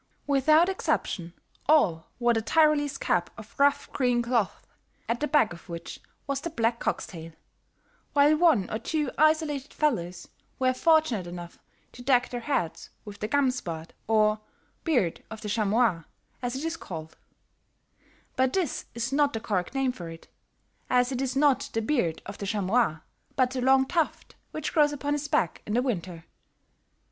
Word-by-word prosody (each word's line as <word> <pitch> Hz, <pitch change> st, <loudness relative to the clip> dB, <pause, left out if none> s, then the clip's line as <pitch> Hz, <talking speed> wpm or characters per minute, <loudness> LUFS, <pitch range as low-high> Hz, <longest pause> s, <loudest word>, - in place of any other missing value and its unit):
Without 305 Hz, +4 st, +4 dB
exception, 180 Hz, -, -1 dB, 0.4 s
all 190 Hz, -, +3 dB
wore 240 Hz, -1 st, +3 dB
the 225 Hz, -, 0 dB
Tyrolese 300 Hz, +3 st, +3 dB
cap 175 Hz, -1 st, 0 dB
of 220 Hz, -1 st, -11 dB
rough 285 Hz, 0 st, +2 dB
green 245 Hz, -3 st, +2 dB
cloth, 235 Hz, -4 st, -1 dB, 0.4 s
at 235 Hz, +1 st, -1 dB
the 300 Hz, -, 0 dB
back 290 Hz, -, +3 dB
of 170 Hz, +2 st, -14 dB
which 170 Hz, -1 st, -7 dB, 0.3 s
was 275 Hz, 0 st, -2 dB
the 335 Hz, -, -3 dB
black 235 Hz, -5 st, 0 dB
cock's -, -, -1 dB
tail, 165 Hz, -2 st, -10 dB, 0.8 s
while 290 Hz, +1 st, +5 dB
one 305 Hz, -, +4 dB
or 220 Hz, -, -2 dB
two 300 Hz, -1 st, -1 dB
isolated 310 Hz, -2 st, +2 dB
fellows 180 Hz, -, -1 dB, 0.3 s
were 255 Hz, -1 st, +2 dB
fortunate 310 Hz, -, +2 dB
enough 175 Hz, 0 st, -8 dB, 0.3 s
to 245 Hz, -, -12 dB
deck 250 Hz, -1 st, +3 dB
their 245 Hz, -, -4 dB
hats 200 Hz, -, -2 dB, 0.2 s
with 205 Hz, -1 st, -9 dB
the 210 Hz, -, -2 dB
Gamsbart 245 Hz, -, -1 dB, 0.2 s
or 215 Hz, -1 st, +3 dB, 0.4 s
Beard 245 Hz, -, +1 dB
of 220 Hz, -1 st, -8 dB
the 210 Hz, -, -5 dB
Chamois, 215 Hz, -4 st, +2 dB, 0.4 s
as 245 Hz, 0 st, -2 dB
it 270 Hz, -, -4 dB
is 330 Hz, 0 st, -2 dB
called; 160 Hz, -, -8 dB, 1.2 s
but 260 Hz, 0 st, +2 dB
this 360 Hz, -8 st, -1 dB
is 240 Hz, +3 st, -2 dB
not 290 Hz, 0 st, +3 dB
the 225 Hz, -, -2 dB
correct 200 Hz, +1 st, -2 dB
name 270 Hz, -1 st, +1 dB
for 175 Hz, -8 st, -8 dB
it, 165 Hz, 0 st, -11 dB, 0.6 s
as 250 Hz, 0 st, +3 dB
it 260 Hz, -1 st, -2 dB
is 265 Hz, -1 st, -2 dB
not 280 Hz, -2 st, +3 dB
the 225 Hz, -, +1 dB
beard 215 Hz, -, 0 dB
of 200 Hz, -, -8 dB
the 200 Hz, -, -4 dB
chamois 200 Hz, -4 st, +1 dB, 0.3 s
but 255 Hz, -2 st, +2 dB
the 260 Hz, -1 st, -3 dB
long 265 Hz, +1 st, +5 dB
tuft 330 Hz, +2 st, -1 dB, 0.2 s
which 310 Hz, -, -4 dB
grows 295 Hz, -2 st, +4 dB
upon 290 Hz, 0 st, -2 dB
his 295 Hz, 0 st, -2 dB
back 175 Hz, -, 0 dB
in 210 Hz, -, -1 dB
the 245 Hz, -, +3 dB
winter. 180 Hz, -9 st, -3 dB
245 Hz, 170 wpm, -27 LUFS, 200-285 Hz, 1.2 s, while